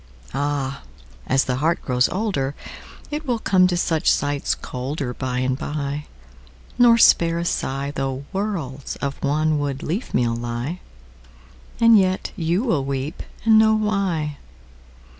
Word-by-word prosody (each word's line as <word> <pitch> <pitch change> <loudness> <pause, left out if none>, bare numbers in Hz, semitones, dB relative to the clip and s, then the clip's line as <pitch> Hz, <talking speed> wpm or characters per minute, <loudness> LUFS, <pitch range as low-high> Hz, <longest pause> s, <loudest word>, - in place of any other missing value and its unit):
Áh! 140 -1 -1 0.5
ás 135 +1 +4
the 125 -1 -1
heart 160 +5 +1
grows 125 -1 +2
olderIt 180 -10 -1 0.7
will 250 -5 0
come 185 -4 +3
to 175 -1 0
such 165 -3 +1
sights 145 -1 +1
colderBy 130 -1 -3
and 130 +1 -1
by, 145 0 -3 0.7
nor 235 -1 +7
spare 170 -6 +5
a 170 - -1
sighThough 135 -3 -2
worlds 170 -10 -3
of 140 -1 -4
wanwood 145 -1 0
leafmeal 125 - -1
lie; 120 +8 -4 1.0
And 230 -2 +7
yet 185 -1 0
you 170 +5 0
wíll 160 - +1
weep 135 +3 -3 0.2
and 220 -1 +7
know 220 0 +5
why. 195 -9 -1
145 Hz, 120 wpm, -22 LUFS, 135-185 Hz, 1.0 s, nor